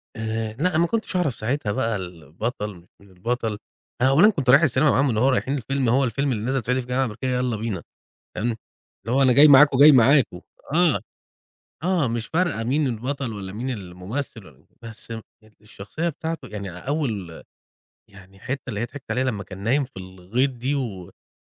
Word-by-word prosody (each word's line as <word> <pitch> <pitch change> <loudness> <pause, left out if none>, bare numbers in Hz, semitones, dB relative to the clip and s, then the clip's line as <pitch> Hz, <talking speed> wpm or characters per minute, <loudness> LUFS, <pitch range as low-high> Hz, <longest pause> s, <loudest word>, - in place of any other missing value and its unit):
آآ 110 0 -3
لأ، 155 +11 +1
أنا 155 - -1
ما 170 +1 +3
كنتش 225 -2 -2
أعرف 160 -10 +1
ساعتها 115 -2 -1
البطَل 95 - -5
مش 85 0 -17
من 100 - -19
البطَل، 110 +3 -3 0.4
أنا 130 - +5
أولًا 170 +11 +6
كنت 140 -10 -2
رايِح 140 +5 +8
السينما 145 -1 +3
معاهم، 135 +1 +2
اللي 110 -3 0
هو 130 - +4
رايِحين 135 +1 0
الفيلم، 130 0 -1
هو 135 +3 +3
الفيلم 135 +4 0
اللي 110 -4 -2
نازِل 130 0 -1
صعيدي 125 +2 +1
في 120 - -11
الجامعة 125 +1 0
الأمريكية، 120 +3 -5
يلا 125 -2 0
بينا، 105 -4 -4 0.5
تمام. 115 +1 -1 0.5
اللي 120 +3 -1
هو 135 - +4
أنا 130 -2 +5
جاي 145 +5 +8
معاكم، 140 -1 +7
جاي 150 +1 +9
معاكم، 125 -7 +4 0.3
آه. 170 -4 +3 0.8
آه، 180 -6 +1
مش 115 0 -3
فارقة 165 -9 0
مين 140 +5 +1
البطَل 125 +1 -3
والّا 95 -2 -7
مين 125 +5 -4
الممثل، 105 +3 -6
والّا 70 -4 -19 0.2
بس 115 0 -10
ال 115 0 -5 0.4
الشخصية 105 +10 -5
بتاعته 160 -3 -5
يعني 105 -3 -6
أول 105 - -4 0.7
يعني 95 0 -16
الحتة 130 +6 -5
اللي 105 -4 -3
هي - - 0
ضحِكت 125 0 -10
عليها 125 +4 +1
لما 110 -6 -2
كان 95 0 -10
نايِم 125 +8 +1
في 135 - -17
الغِيط، 95 +8 -2
دي، 125 +3 -3
ومش 105 -10 -6
120 Hz, 190 wpm, -23 LUFS, 105-140 Hz, 0.8 s, جاي